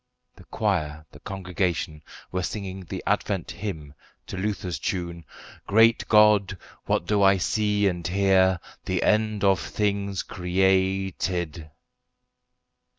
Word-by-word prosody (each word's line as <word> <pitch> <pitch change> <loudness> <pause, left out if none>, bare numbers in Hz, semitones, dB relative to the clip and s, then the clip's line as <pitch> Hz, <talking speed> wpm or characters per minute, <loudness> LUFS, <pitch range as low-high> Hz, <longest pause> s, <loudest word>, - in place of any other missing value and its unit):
The - - -16
choir, 80 -7 -2
the - - -14
congregation, 90 -4 -3 0.3
were 90 - -1
singing 95 0 -5
the - - -6
Advent - - -1
hymn 80 -8 -6 0.3
to - - -7
Luther's 95 -3 -3
tune 85 -3 -4 0.4
"Great 115 +3 +4
God, 105 -3 +5 0.3
what - - +1
do 105 -1 +1
I 95 0 +5
see 105 +1 +1
and 90 -2 -2
hear? 95 -1 +3 0.3
The 95 -2 -1
end 110 -1 +1
of 95 -2 +4
things 100 -2 -2
created." 95 -3 0
95 Hz, 115 wpm, -25 LUFS, 90-100 Hz, 0.4 s, God